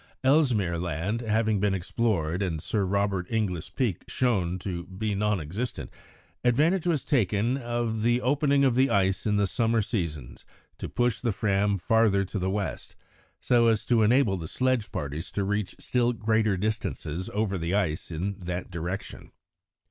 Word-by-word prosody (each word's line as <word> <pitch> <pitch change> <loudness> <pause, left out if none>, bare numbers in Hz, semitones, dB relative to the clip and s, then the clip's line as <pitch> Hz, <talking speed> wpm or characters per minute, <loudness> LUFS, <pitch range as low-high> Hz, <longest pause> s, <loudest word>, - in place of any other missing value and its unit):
Ellesmere 125 - +3
Land 90 +7 -2
having 110 -2 +1
been 100 -1 +1
explored 90 -3 -1
and 85 -5 -1
Sir 100 +5 -1
Robert 100 -1 0
Inglis 100 -8 -1
Peak 115 -10 -1
shown 95 -9 0
to 90 -2 -5
be 105 +3 -3
non 105 0 +1
existent, 95 +11 -4 0.5
advantage 155 +9 +2
was 160 -6 0
taken 115 - +1
of 120 -3 -2
the 120 +2 +3
opening 140 +2 +2
of 130 - +3
the 130 +3 +3
ice 95 +1 +1
in 105 - +2
the 100 - +3
summer 115 +3 +1
seasons 80 - -4 0.4
to - - -5
push 120 -2 0
the 120 - +1
Fram 100 0 +1
farther 100 +1 +3
to 100 +2 -4
the 95 +1 -1
west, 100 0 -4 0.4
so 120 -2 +3
as 110 -2 +2
to 120 -2 +3
enable 110 -2 +3
the 80 -2 -6
sledge 130 +1 0
parties 75 +4 -4
to 100 - 0
reach 105 0 -2
still 120 -1 0
greater 110 -2 +1
distances 95 - -3
over 100 -2 -1
the 85 +3 -1
ice 85 -7 -1
in 95 +5 -3
that 90 0 -5
direction. 85 +3 -5
105 Hz, 165 wpm, -27 LUFS, 90-115 Hz, 0.5 s, Ellesmere